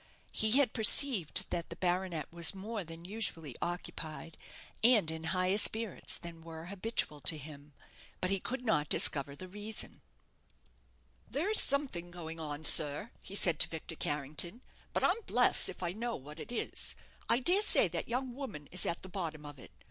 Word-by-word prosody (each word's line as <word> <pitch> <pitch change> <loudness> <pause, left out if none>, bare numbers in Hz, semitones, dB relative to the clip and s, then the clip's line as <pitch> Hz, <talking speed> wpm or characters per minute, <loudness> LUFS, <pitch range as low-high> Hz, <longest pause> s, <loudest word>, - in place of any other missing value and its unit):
He 215 0 +2
had 270 -3 +5
perceived 215 - +3
that 170 -1 -3
the - - -7
baronet 175 -4 -2
was 170 +2 +5
more 205 +2 -5
than 165 0 -11
usually 175 - 0
occupied, 170 -2 -6 0.5
and 220 -9 +5
in 160 0 -6
higher 185 +3 +1
spirits 220 -2 +2
than 170 -1 -10
were 160 0 -9
habitual 195 -7 -1
to 155 - 0
him; 145 0 -12 0.5
but 185 - -1
he 195 - +1
could 250 +5 -5
not 150 -9 +1
discover 140 -1 +3
the 185 +6 -10
reason. 210 +3 -4 1.3
"There's 390 +10 +4
something 265 -12 +3
going 165 -2 -8
on, 150 -1 -6
sir," 150 +7 +5
he 195 - -10
said 170 -5 +2
to - - +2
Victor 165 0 -7
Carrington; 150 - -4 0.3
"but - - -2
I'm 410 +6 +2
blest - - +4
if - - -8
I 175 - -1
know 230 +4 -4
what 150 +4 -11
it - - -8
is. 240 - -3 0.3
I 235 - +5
dare 355 +10 +3
say 410 - +4
that 165 0 -5
young 250 +1 -3
woman 220 - -8
is 185 - 0
at 170 - -2
the - - -9
bottom 165 -5 -5
of 145 -2 -10
it. - - -13
175 Hz, 175 wpm, -32 LUFS, 160-220 Hz, 1.3 s, had